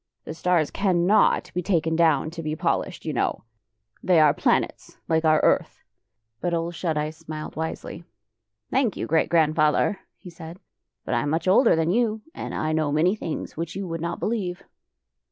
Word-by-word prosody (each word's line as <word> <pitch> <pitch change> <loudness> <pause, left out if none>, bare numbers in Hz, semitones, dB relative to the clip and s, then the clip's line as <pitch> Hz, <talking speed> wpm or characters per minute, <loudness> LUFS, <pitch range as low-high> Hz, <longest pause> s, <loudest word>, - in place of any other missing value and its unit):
The - - -7
stars 170 -2 +1
cannot 190 +1 +2
be 180 - -1
taken 165 -4 0
down 160 -2 +2
to 165 0 -7
be 155 -1 -3
polished, 175 +2 -2
you 155 - -2
know! - - -1 0.6
They 180 -3 +4
are 150 -2 +6
planets, - - -1
like 160 0 +1
our 155 -1 +5
earth! - - +1 0.3
" 110 0 -53
But 175 -1 0
Ole 165 +1 -2
Shut 165 -2 -2
Eyes 150 +1 -2
smiled 155 -1 -8
wisely. 160 +1 -5 0.3
" 110 -1 -52
Thank 255 -5 +1
you, - - -3
Great 160 +1 +1
Grandfather," 155 +4 +2 0.2
he 180 - -12
said, 165 +1 -10 0.2
" - - -58
but - - -2
I 120 - +2
am 145 - -2
much 160 +4 -1
older 195 +4 +5
than 160 +1 +1
you, 220 0 0
and - - -6
I 155 - -1
know 155 -2 0
many 160 +6 +3
things 165 -7 -5
which 165 +1 -5
you 195 -1 -4
would 165 -1 -4
not 170 0 -3
believe. 195 -6 -3
165 Hz, 190 wpm, -24 LUFS, 155-180 Hz, 0.6 s, are